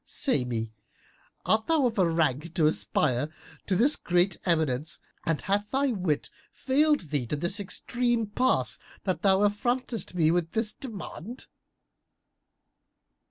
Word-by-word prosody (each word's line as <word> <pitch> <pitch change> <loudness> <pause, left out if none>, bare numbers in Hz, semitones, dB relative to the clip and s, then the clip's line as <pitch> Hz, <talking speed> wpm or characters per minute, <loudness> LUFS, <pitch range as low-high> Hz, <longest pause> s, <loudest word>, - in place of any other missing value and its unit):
Say 145 - 0
me, 115 -2 -3 0.7
art 220 0 +2
thou 320 -5 +3
of 230 -3 0
a 180 -3 +4
rank 160 0 0
to 165 -4 +3
aspire 150 -3 +1 0.4
to 190 - +1
this 255 +10 +5
great 180 +1 +1
eminence 155 -3 +1 0.3
and 165 -2 +1
hath 205 +1 0
thy 270 +1 +1
wit 180 -9 -1 0.2
failed 295 +2 +2
thee 140 -5 -1
to 150 - -1
this 175 +7 -1
extreme 240 +4 0
pass 250 +5 0 0.2
that 185 -2 -1
thou 195 0 +4
affrontest 235 -1 -2
me 160 -2 +3
with 170 -1 -1
this 220 -1 0
demand?" 225 - -8
190 Hz, 135 wpm, -27 LUFS, 160-235 Hz, 0.7 s, this